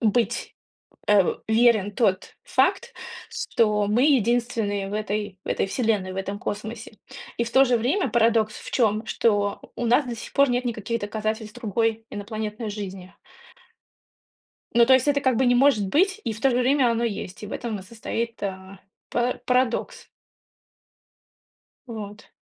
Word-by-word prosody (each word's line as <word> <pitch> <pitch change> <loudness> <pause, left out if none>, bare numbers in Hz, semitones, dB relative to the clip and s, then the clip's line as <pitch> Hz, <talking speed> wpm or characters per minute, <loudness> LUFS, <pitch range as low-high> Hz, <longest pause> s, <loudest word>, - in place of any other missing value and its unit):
быть, 230 +1 0 0.5
э, 205 -2 +6 0.2
верен 220 -3 +3
тот 195 -5 0
факт, - - +1 0.4
что 210 -2 +1
мы 235 +5 +2
единственные 235 -6 +1
в 205 - -6
этой 210 -2 -3
в - - -10
этой - - 0
вселенной, 205 -3 0
в - - -9
этом 200 +1 -3
космосе. 215 +1 -6 0.4
И 235 - +1
в 230 - -6
то 270 +2 +6
же 245 -1 +2
время 275 - 0
парадокс 225 -2 +2
в - - -9
чём: 220 -2 +1
что 205 -3 +1 0.2
у 240 - -3
нас 250 +4 +4
до 240 -1 -4
сих - - -9
пор 280 -1 +4
нет 245 +1 0
никаких 230 0 -3
доказательств 215 +2 -4
другой 225 0 -1
инопланетной 215 +1 -5
жизни. 195 -3 -7 1.6
Ну 235 0 +6
то 260 - +7
есть 260 +2 +3
это 285 0 +3
как 260 -4 +2
бы 260 - +2
не 245 - +4
может 245 -6 +4
быть, 385 - +2
и 230 - -1
в 220 - -9
то 270 - +3
же 245 - 0
время 255 -1 +3
оно 230 +1 0
есть, 205 -3 -5
и - - -5
в - - -9
этом 225 -4 -4
и - - -9
состоит, 230 +2 -5
э, 190 0 -6 0.3
пара 245 +1 0
парадокс. 250 -1 0 1.8
Вот. 210 -2 -8
225 Hz, 165 wpm, -24 LUFS, 205-245 Hz, 1.8 s, то